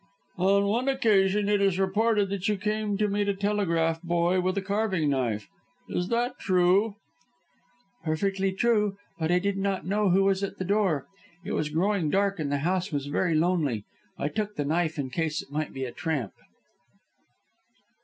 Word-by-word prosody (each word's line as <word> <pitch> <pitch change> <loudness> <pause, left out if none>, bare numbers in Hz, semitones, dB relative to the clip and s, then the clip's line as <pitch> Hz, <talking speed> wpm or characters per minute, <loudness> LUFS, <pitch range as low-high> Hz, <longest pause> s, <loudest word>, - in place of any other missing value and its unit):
"On 200 +2 +3
one 235 +6 0
occasion 210 -6 +3
it 205 -1 +2
is 195 -2 +2
reported 205 +2 +2
that 200 -1 -2
you 210 -1 +1
came 210 0 -1
to 210 0 +2
meet 205 0 0
a 200 - 0
telegraph 170 -5 0
boy 175 +1 +1
with 185 +2 -1
a - - +1
carving 195 -6 0
knife. 120 -6 -1 0.4
Is 180 - -2
that 240 +3 -1
true?" 190 +3 +3 1.1
"Perfectly 195 +4 0
true. 210 -1 +1 0.2
But 160 +1 0
I 180 - +4
did 195 +2 -1
not 195 -4 -1
know 205 +2 +1
who 190 +2 +4
was 195 0 +2
at 200 - -4
the 185 - -3
door. 190 -7 +1 0.4
It - - -5
was 150 - -1
growing 175 +1 +1
dark, 195 +2 +1
and 145 -2 -2
the 145 - +1
house 185 +1 0
was 145 -2 -2
very 160 +4 0
lonely. 155 - +1 0.3
I 140 - -1
took 210 +5 -3
the 145 - -2
knife 160 +1 0
in 135 -3 -3
case 160 +2 -1
it - - -21
might 155 +1 -2
be 135 0 -4
a 125 - -5
tramp." 145 - -3
190 Hz, 180 wpm, -27 LUFS, 160-205 Hz, 1.1 s, I